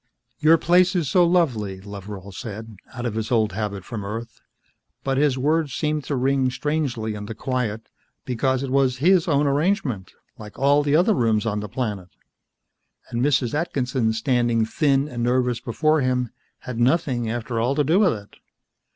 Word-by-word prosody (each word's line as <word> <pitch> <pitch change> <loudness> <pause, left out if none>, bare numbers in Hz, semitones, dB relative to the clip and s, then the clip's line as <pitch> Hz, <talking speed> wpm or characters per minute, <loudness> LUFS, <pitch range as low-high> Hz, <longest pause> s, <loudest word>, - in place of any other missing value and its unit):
"Your 155 +2 +6
place 180 +3 +3
is 165 -7 0
so 180 - +5
lovely," 125 - +1
Loveral 100 0 -9
said, 110 +3 -7 0.2
out 120 0 -5
of 120 - -1
his 110 +1 -3
old 110 -3 +2
habit 100 -2 -4
from 110 -4 -5
Earth. 115 +3 -7 0.6
But 135 0 0
his 145 -3 +2
words 150 0 0
seemed 150 -1 -1
to 145 - -2
ring 130 0 +1
strangely 130 -5 -2
in 105 0 -7
the 115 - -6
quiet, 115 -3 -3 0.4
because 130 +2 0
it 135 - -4
was 135 -2 +2
his 175 +5 +3
own 145 -2 +2
arrangement, 145 - 0 0.3
like 105 -1 -11
all 140 +2 +4
the 145 0 +1
other 180 +7 +4
rooms 110 - +1
on 105 -2 -1
the 105 0 -6
planet. 105 -6 -4 1.0
And 120 - -1
Mrs. 130 -3 +1
Atkinson, 130 -7 0
standing 120 -1 +1
thin 140 +3 +1
and 120 -5 -5
nervous 125 0 +1
before 155 +5 +1
him, 125 -2 0 0.3
had 125 -2 -6
nothing, 125 -3 +1
after 120 0 -3
all, 125 +4 +1
to 150 - +2
do 160 +7 +3
with 195 -5 +4
it. 100 -2 -10
125 Hz, 175 wpm, -23 LUFS, 110-145 Hz, 1.0 s, Your